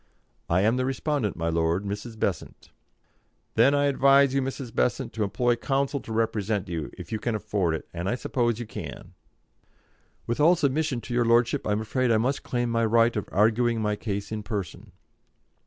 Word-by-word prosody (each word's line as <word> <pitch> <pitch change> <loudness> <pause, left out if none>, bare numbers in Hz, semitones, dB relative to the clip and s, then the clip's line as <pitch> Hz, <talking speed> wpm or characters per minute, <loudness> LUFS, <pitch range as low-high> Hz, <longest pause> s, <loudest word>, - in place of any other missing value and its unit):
"I 85 +2 +3
am 110 +5 +2
the 130 - 0
respondent, 135 - -1
my 85 0 -2
lord, 85 +4 0
Mrs. 105 +3 -5
Besant." 95 -7 -3 0.8
"Then 140 +2 +4
I 145 0 +2
advise 140 0 +4
you, 135 - +2
Mrs. 130 -2 -5
Besant, 120 - 0
to 110 - -1
employ 120 +4 +1
counsel 140 +3 -1
to 115 - -10
represent 110 -3 -1
you, 85 -3 -4
if - - -9
you 110 - -2
can 115 +1 -1
afford 95 -5 -1
it; - - -7
and 90 +2 -3
I 120 - 0
suppose 120 -2 -1
you 120 - -4
can." 105 -8 -8 1.1
"With 120 - -2
all 165 +4 +6
submission 145 -4 0
to 120 - -7
your 120 0 +2
lordship, 115 0 +2
I - - 0
am 105 - -1
afraid 125 +3 0
I 115 - +4
must 130 +5 0
claim 120 -2 -2
my 115 0 +1
right 115 +1 +3
of 105 - -3
arguing 115 +3 +2
my 105 -1 0
case 100 -1 -4
in 110 -1 -3
person." 100 -5 -5
115 Hz, 190 wpm, -26 LUFS, 105-130 Hz, 1.1 s, all